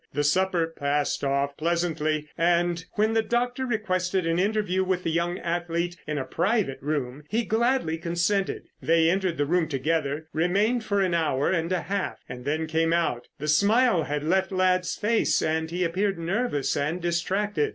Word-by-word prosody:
The 145 +2 0
supper 180 +3 +2
passed 145 -3 -1
off 140 0 0
pleasantly, 155 -2 0
and 170 0 +1
when 215 +1 +1
the 225 - +3
doctor 245 +3 -1
requested 185 -5 0
an 165 +1 +1
interview 200 -2 +1
with 185 -1 -1
the 165 - -1
young 170 +2 0
athlete 170 0 -2
in 150 -1 -2
a 135 - -2
private 190 - 0
room, 140 -1 -3
he 230 +2 0
gladly 225 -7 +1
consented. 175 +4 0 0.2
They 165 0 +3
entered 185 -2 0
the 145 - +1
room 170 +2 +1
together, 150 +1 -1
remained 200 +9 +1
for 200 -2 0
an 185 -2 +1
hour 155 -5 +1
and 170 -1 0
a 185 - +1
half, 195 +1 -3
and 125 0 -8
then 155 +3 0
came 165 +1 +1
out. 165 -8 0
The 150 - -5
smile 200 +2 +3
had 150 0 -2
left 190 +5 +1
Ladd's 185 -1 +1
face 225 +2 +2
and 160 0 -1
he 175 +2 -1
appeared 190 +3 0
nervous 170 - -1
and 155 +5 -1
distracted. 175 0 0
170 Hz, 170 wpm, -26 LUFS, 155-190 Hz, 0.2 s, the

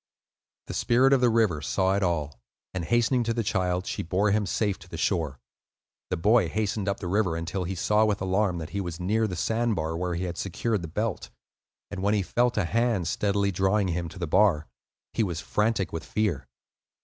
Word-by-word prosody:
The - - -6
Spirit 130 +3 +3
of 135 - +4
the 125 - +5
River 110 -9 +2
saw 95 +4 +1
it 100 - 0
all, 75 -8 -1 0.3
and 95 -2 -3
hastening 120 +3 +2
to 115 0 0
the 115 - 0
child, 90 -2 0
she - - -3
bore 95 +5 +1
him 105 -1 +1
safe 100 +1 0
to 90 - -15
the 80 - -6
shore. 80 -7 -1 0.7
The 90 - -1
boy 110 +7 +3
hastened 105 -1 -1
up 100 - -2
the 90 - -5
river 95 -2 +1
until 90 +3 -3
he 95 +2 -3
saw 105 +5 +2
with 105 -2 0
alarm 95 0 +1
that 80 -1 -6
he 100 - -2
was 85 -3 -5
near 110 +5 +1
the 90 - -4
sand 115 +5 0
bar 80 -1 -2
where 90 0 -2
he 90 - -2
had 90 -1 -4
secured 105 +2 -1
the 85 - -5
belt; 105 +5 -3 0.6
and 100 -2 -5
when 100 +2 +2
he 100 - +1
felt 120 +5 +1
a 105 - +2
hand 115 -3 +1
steadily 100 +2 +1
drawing 95 +2 +1
him 85 0 -2
to 95 - -12
the 90 - -2
bar, 80 -2 +3 0.5
he - - 0
was 90 -6 -1
frantic 105 0 0
with 80 -1 -4
fear. 90 - -1
95 Hz, 215 wpm, -27 LUFS, 85-110 Hz, 0.7 s, the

